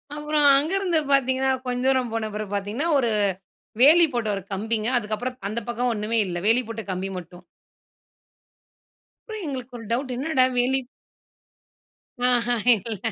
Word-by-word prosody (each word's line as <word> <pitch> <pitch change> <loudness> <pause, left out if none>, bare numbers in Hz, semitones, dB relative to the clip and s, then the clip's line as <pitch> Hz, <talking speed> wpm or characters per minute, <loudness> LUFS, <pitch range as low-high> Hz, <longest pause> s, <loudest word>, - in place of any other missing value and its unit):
அப்புறம் 300 0 0
அங்கேருந்து 345 +3 +1
பார்த்தீங்கன்னா, 265 -1 +2 0.2
கொஞ்ச 250 0 -2
தூரம் 260 -3 +1
போன 225 -1 -2
பிறகு 210 -1 -5
பார்த்தீங்கன்னா, 205 +10 -2
ஒரு 245 -4 +1 0.7
வேலி 325 +6 +8
போட்ட 235 -2 -1
ஒரு 195 - -6
கம்பிங்க. 220 +2 -2
அதுக்கப்பறம் 240 +3 -3
அந்த 220 +3 -2
பக்கம் 240 +1 -1
ஒன்னுமே 220 +2 0
இல்ல. 175 -1 -4
வேலி 230 +3 +4
போட்ட 225 -1 -6
கம்பி 185 +1 -3
மட்டும். 180 0 -11 1.9
அப்பறம் 430 -4 -6
எங்களுக்கு 255 -3 -6
ஒரு 230 - -10
டவுட் 255 +3 -1
என்னடா! 270 0 +2
வேலி. 255 +2 +2 1.5
ஆஹா! 245 -1 +2 0.2
இல்ல, 220 +1 -5
245 Hz, 135 wpm, -24 LUFS, 220-270 Hz, 1.9 s, வேலி